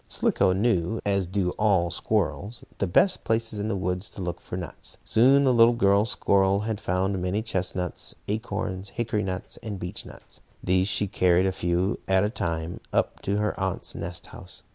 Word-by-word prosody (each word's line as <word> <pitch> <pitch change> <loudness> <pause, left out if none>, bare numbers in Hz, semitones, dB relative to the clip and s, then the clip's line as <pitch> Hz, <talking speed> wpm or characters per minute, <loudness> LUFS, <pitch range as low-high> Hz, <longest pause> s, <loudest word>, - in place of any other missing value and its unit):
Slicko 95 - +2
knew, 95 0 +1
as 100 -2 +1
do 95 -1 0
all 95 -5 +3
squirrels, 100 +3 -1 0.2
the 100 - +1
best 185 - +3
places 115 -1 0
in 105 - -2
the 110 - -1
woods 90 +1 -2
to - - -9
look 90 0 -4
for 90 - -6
nuts. 90 -2 -6
Soon 135 +5 +5
the 130 -2 +4
little 120 0 +6
girl 100 -2 +4
squirrel 100 -3 +2
had 110 -1 -3
found 95 +1 0
many 95 +4 -1
chestnuts, 90 -4 -1
acorns, 105 -3 -3
hickory 110 0 -1
nuts 95 -2 -4
and 105 -3 -6
beech 90 -1 -5
nuts. - - -13 0.2
These 95 +1 +2
she 100 +1 +1
carried, 90 -2 +3
a 95 - +2
few 90 +2 0
at 95 0 +3
a 105 - 0
time, 85 -5 -3
up - - 0
to 100 +1 -1
her 105 0 0
aunt's 95 -1 -2
nest 85 0 -5
house. - - -10
95 Hz, 185 wpm, -26 LUFS, 90-105 Hz, 0.2 s, little